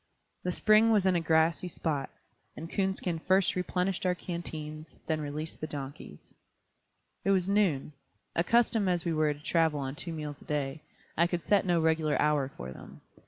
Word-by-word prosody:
The 180 - -1
spring 215 +4 +5
was 210 -4 +3
in 185 -1 +4
a - - +3
grassy 165 +2 +2
spot, 150 -5 -2 0.5
and 165 - -6
Coonskin 190 -3 -1
first 190 +2 +2
replenished 180 0 -1
our 180 -1 +2
canteens, 155 -3 -6
then 155 -1 -1
released 150 +2 -5
the 155 - -2
donkeys. 135 - -8 0.9
It - - 0
was 190 -2 +3
noon. 190 -9 +1 0.4
Accustomed 220 +2 +3
as 175 -1 0
we 170 - +1
were 155 -1 +2
to - - -15
travel 160 -3 +2
on 135 -1 -3
two 170 +4 -5
meals 150 -2 -6
a - - -15
day, 145 0 -2 0.3
I 170 +2 +4
could 175 -1 -3
set 200 -2 +2
no 175 -1 +3
regular 160 -1 +2
hour 150 -3 +2
for 65 +2 -6
them. - - -12
165 Hz, 175 wpm, -30 LUFS, 150-185 Hz, 0.9 s, spring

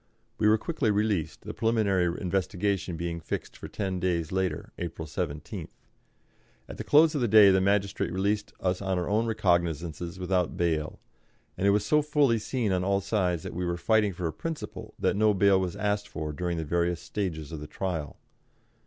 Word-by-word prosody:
We 105 - +3
were 110 +1 +5
quickly 140 -1 -1
released, 105 -5 0
the - - -7
preliminary 100 -6 +1
investigation 95 -1 -1
being 85 0 -3
fixed 80 - -5
for - - -8
ten 95 -3 -3
days 85 -3 -1
later 95 -1 -2
April 85 -2 -5
17th. 75 -2 -4 1.0
At - - -9
the - - -4
close 155 +2 +5
of 145 - -1
the 120 - +2
day 105 -2 +8
the 95 0 +3
magistrate 100 -1 +1
released 100 +3 -1
us 90 0 -1
on 95 -2 -1
our 90 - -1
own 110 +3 +1
recognisances, 85 -4 0
without 90 -1 0
bail; 80 -3 -1 0.6
and 100 - 0
it - - +6
was 105 +1 +2
so 150 +7 +4
fully 145 -6 +2
seen 115 -1 -1
on 90 -1 +1
all 100 +1 +2
sides 90 -5 0
that - - -6
we 90 - -3
were 85 -1 -1
fighting 105 +3 +2
for 90 -1 -5
a 80 - -1
principle 165 -2 -6
that - - +1
no 105 0 +3
bail 95 0 +4
was 95 0 -2
asked 105 0 -1
for 75 -4 -5
during 85 +2 -2
the 80 - -3
various 85 +2 0
stages 80 -8 -4
of 80 - -5
the 75 - -8
trial. 85 -6 -4
95 Hz, 190 wpm, -28 LUFS, 85-105 Hz, 1.0 s, day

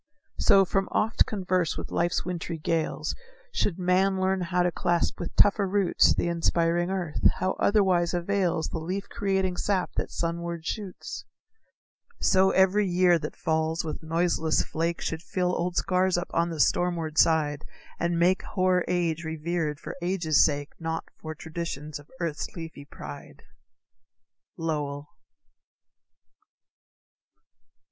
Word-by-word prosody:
So, 195 -1 +6
from 195 +1 0
oft 225 +2 +2
converse 185 -4 0
with - - -6
life's 175 +1 0
wintry 175 -2 -4
gales, 160 +1 -1 0.4
Should 205 - 0
man 190 +1 +2
learn 190 0 +1
how 180 0 +1
to 175 - +1
clasp 175 +1 0
with 175 - -5
tougher 205 -1 +5
roots 195 -1 +3
The - - 0
inspiring 170 +1 +1
earth 180 -5 -2 0.2
how 185 - 0
otherwise 185 -5 +3
avails 175 -2 0
The 165 - -4
leaf 185 +5 -4
creating 190 -2 -1
sap 195 -1 0
that - - -1
sunward 170 0 -3
shoots? 200 -2 -5 0.9
So 190 0 +4
every 190 +2 +3
year 175 -1 +4
that 150 - -6
falls 160 +1 0
with 155 - -5
noiseless 165 0 +1
flake, 165 +1 -2
Should 160 0 -3
fill 180 +1 -1
old 175 +1 -2
scars 185 -1 +2
up 175 - -4
on 170 +1 +1
the 165 -2 -5
stormward 165 -2 +1
side, 155 -2 +3 0.4
And 170 0 0
make 180 +2 +3
hoar 185 -2 +1
age 170 -2 0
revered 160 -1 -2
for - - -7
age's 170 -4 +3
sake, 145 -1 0
Not 165 -1 -3 0.2
for 155 0 -6
traditions 155 -2 -5
of 145 - -17
earth's 165 -4 -2
leafy 160 -4 -8
pride. 70 - -10 1.1
_Lowell. 145 -3 -3
170 Hz, 135 wpm, -27 LUFS, 160-185 Hz, 1.1 s, So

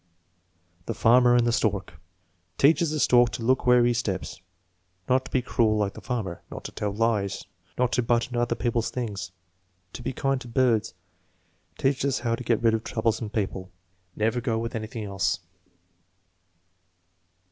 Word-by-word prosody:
The 115 - -2
Farmer 120 +2 +5
and 120 -1 +4
tJie 120 - +1
Stork. 105 -7 0 0.6
"Teaches 160 +3 +4
the 155 0 -2
stork 120 -3 +5
to 115 - -4
look 130 +2 +1
where 125 -1 +6
he 120 - +3
steps." 105 -5 -3 0.7
"Not 130 +1 +2
to - - -10
be 130 - +1
cruel 110 -4 +2
like 100 -1 0
the - - -10
farmer." 110 -9 -4
"Not - - -8
to - - -6
tell 105 -1 -3
lies." 105 -2 0 0.3
"Not 125 -1 +1
to 125 - +2
butt 120 0 +1
into 120 -1 -2
other 120 0 0
people's 115 +1 -1
things." 100 -7 -4 0.6
"To - - -7
be - - -3
kind 135 +1 -1
to - - -9
birds." 115 -5 +1 0.8
"Teaches 135 0 +1
us - - -1
how 120 -1 0
to 115 - -3
get 115 -1 0
rid 115 -1 +4
of 110 0 -1
troublesome 110 -1 -1
people." 95 -3 -3 0.5
"Never 115 +3 0
go 115 -3 -1
with 115 +1 -3
anything 110 0 -5
else." 95 -2 0
115 Hz, 170 wpm, -26 LUFS, 110-125 Hz, 0.8 s, where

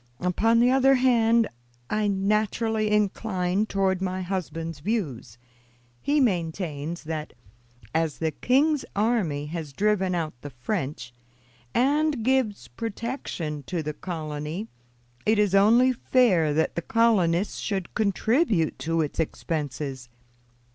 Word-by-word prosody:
Upon 220 +6 +2
the 245 +1 +5
other 270 +1 +5
hand, 235 -3 +3 0.4
I 215 0 0
naturally 215 +2 +1
incline 205 -1 0
toward 190 -2 0
my 185 0 -2
husband's 165 -4 -4
views. 145 - -3 0.6
He 295 +1 +2
maintains 170 - -1
that, 155 -1 -5 0.6
as 160 -2 0
the 160 -1 -1
king's 280 - +2
army 200 -10 +1
has 155 -2 -6
driven 190 0 +1
out 160 -3 -2
the 145 - -7
French, 125 0 -4 0.6
and 285 0 +2
gives 250 - +1
protection 195 - -4
to 175 -4 -2
the 150 0 -3
colony, 155 +3 -5 0.6
it 220 +1 +3
is 205 -2 +2
only 230 +6 +5
fair 220 - +3
that 155 +2 +1
the 170 - -2
colonists 200 -4 +2
should 195 -4 -3
contribute 220 - +1
to 165 0 0
its 150 +1 -3
expenses. 145 -5 -3
190 Hz, 120 wpm, -26 LUFS, 160-225 Hz, 0.6 s, the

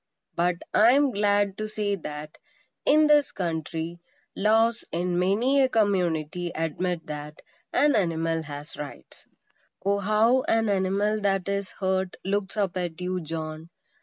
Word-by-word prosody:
But 175 +1 +1 0.2
I 225 +3 +6
am 280 -1 +3
glad 205 -2 +1
to 215 - -2
say 210 -1 -2
that, 150 -4 -7 0.5
in 305 +1 +5
this 295 -1 +4
country, 165 -1 -4 0.4
laws 225 +3 +2
in 175 +1 -1
many 230 +10 +3
a 260 - +3
community 180 -6 0
admit 165 +2 -2
that 150 +1 -7 0.3
an 285 +2 +3
animal 165 -4 0
has 145 0 -8
rights. 145 -1 -9 0.6
Oh, 200 0 +2
how 215 +5 +3
an 225 -1 +2
animal 200 +2 +1
that 195 -2 0
is 200 -1 -2
hurt 190 -1 -1
looks 200 +1 -2
up 195 -3 0
at 175 -2 -3
you, 180 0 -2
John! 160 0 -6
190 Hz, 140 wpm, -26 LUFS, 165-215 Hz, 0.6 s, I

